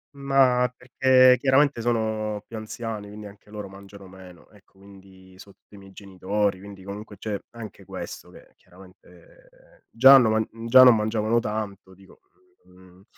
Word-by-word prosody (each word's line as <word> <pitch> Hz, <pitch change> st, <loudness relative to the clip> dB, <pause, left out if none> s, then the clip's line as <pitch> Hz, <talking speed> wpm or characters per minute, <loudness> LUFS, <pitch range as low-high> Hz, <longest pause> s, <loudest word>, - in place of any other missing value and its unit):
ma 130 Hz, -3 st, +1 dB
perché 130 Hz, 0 st, +3 dB
chiaramente 140 Hz, -1 st, +2 dB
sono 110 Hz, -3 st, -2 dB
più 115 Hz, -, -11 dB
anziani, 110 Hz, -1 st, -7 dB
quindi 105 Hz, 0 st, -10 dB
anche 100 Hz, +1 st, -18 dB
loro 105 Hz, -2 st, -8 dB
mangiano 100 Hz, 0 st, -14 dB
meno. 90 Hz, -2 st, -16 dB
Ecco 100 Hz, -2 st, -24 dB
quindi 95 Hz, -1 st, -18 dB
soprattutto 100 Hz, +1 st, -18 dB
i -, -, -14 dB
miei 95 Hz, 0 st, -15 dB
genitori, 100 Hz, 0 st, -3 dB
quindi 100 Hz, -1 st, -13 dB
comunque 100 Hz, +3 st, -10 dB
c'è 105 Hz, -2 st, -5 dB
anche 115 Hz, -2 st, -11 dB
questo -, -, -9 dB
che -, -, -18 dB
chiaramente 95 Hz, -, -21 dB, 0.4 s
già 135 Hz, +3 st, +7 dB
non 115 Hz, -4 st, +3 dB
ma 110 Hz, +1 st, -3 dB
già 130 Hz, +2 st, +7 dB
non 125 Hz, -2 st, +7 dB
mangiavano 110 Hz, +1 st, -1 dB
tanto, 105 Hz, -3 st, -6 dB
dico, 95 Hz, +1 st, -20 dB, 0.5 s
mhmm 90 Hz, 0 st, -21 dB
105 Hz, 150 wpm, -23 LUFS, 95-115 Hz, 0.5 s, già